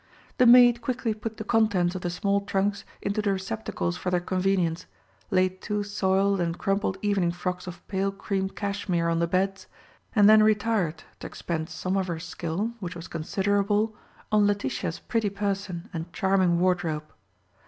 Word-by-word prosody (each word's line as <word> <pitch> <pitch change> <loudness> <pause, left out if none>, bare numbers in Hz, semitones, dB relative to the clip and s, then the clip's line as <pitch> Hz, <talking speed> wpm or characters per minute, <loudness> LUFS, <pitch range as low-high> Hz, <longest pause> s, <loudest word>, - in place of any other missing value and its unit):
The 250 - +6
maid 240 0 +7
quickly 250 -3 -1
put 220 +1 -6
the - - -4
contents 210 -6 +2
of 185 - -5
the 175 - -2
small 200 +3 0
trunks 200 0 -1 0.2
into 205 +2 0
the 205 -1 +1
receptacles 190 -2 -3
for 180 - -3
their 180 -1 +2
convenience, 180 -2 0 0.4
laid 185 0 +1
two 210 -1 -2
soiled 195 -1 +1
and 170 0 -1
crumpled 195 -1 0
evening 195 -4 +2
frocks 180 +1 -4
of 175 0 -9
pale 195 0 0
cream 195 -1 -2
cashmere 195 -4 -1
on 165 0 +1
the 170 - +1
beds, 195 +2 -1 0.5
and 205 -2 +6
then 215 0 +8
retired 210 -7 +1 0.2
to - - -6
expend 160 -1 -4
some 185 +3 -2
of 190 -1 0
her 170 -2 -3
skill, 170 +5 -3
which 180 -3 -5
was 170 +1 -8
considerable, 205 +5 0 0.4
on 210 -1 +4
Letitia's 180 -5 -2
pretty 225 -3 -1
person 195 -3 -3
and 165 0 -5
charming 185 -2 +2
wardrobe. 170 -4 0
195 Hz, 165 wpm, -26 LUFS, 175-205 Hz, 0.5 s, then